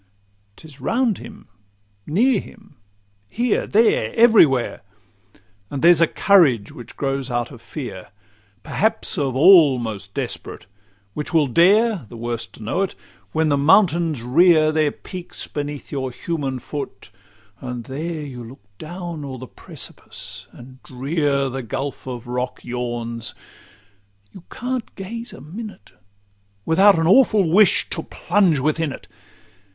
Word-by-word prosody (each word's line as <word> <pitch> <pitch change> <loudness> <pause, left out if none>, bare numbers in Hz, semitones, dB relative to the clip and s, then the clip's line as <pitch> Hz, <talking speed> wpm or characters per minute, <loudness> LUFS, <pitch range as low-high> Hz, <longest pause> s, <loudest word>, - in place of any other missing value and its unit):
'Tis 145 -1 -14
round 230 - 0
him, 215 -3 -12 0.6
near 220 - +3
him, 210 -6 -14 0.5
here, 240 -1 0
there, 210 - +3
every 225 -7 +7
where; 130 -3 -2 0.9
And 140 - -5
there's 170 -1 +6
a 165 - +5
courage 150 - +3
which 120 - -12
grows 135 -1 -2
out 120 0 -2
of 120 -4 -12
fear, 120 - -7 0.6
Perhaps 220 -3 0
of 135 -3 -1
all 150 -2 +7
most 105 -4 -6
desperate, - - -4 0.5
which 150 +3 -5
will 155 -2 +5
dare 185 - +3
The 120 - -10
worst 120 0 -5
to - - -11
know 145 - -1
it:—when 105 - -3
the 145 - +2
mountains 165 - +3
rear 155 +4 +4
Their 155 -1 +2
peaks 180 +3 -7
beneath 145 -1 -6
your 135 -3 -2
human 140 -1 -3
foot, 130 -4 -7 0.5
and 125 -2 -6
there 155 +5 -5
You 125 -4 -8
look 115 -1 -13 0.2
down 170 -1 -7
o'er 135 -2 -6
the 130 - -8
precipice, - - -8
and 130 +1 -14
drear 140 +1 -1
The 130 0 -4
gulf 135 +4 -5
of 125 -2 -6
rock 125 +1 -4
yawns,—you 115 - -8
can't 250 -1 -5
gaze 230 +5 -7
a - - -12
minute 200 - -9 0.7
Without 195 +4 +5
an 165 - +1
awful 205 -1 +5
wish 195 +5 +4
to - - 0
plunge 190 -7 +1
within 155 +2 0
it. - - -10
145 Hz, 135 wpm, -21 LUFS, 125-180 Hz, 0.9 s, every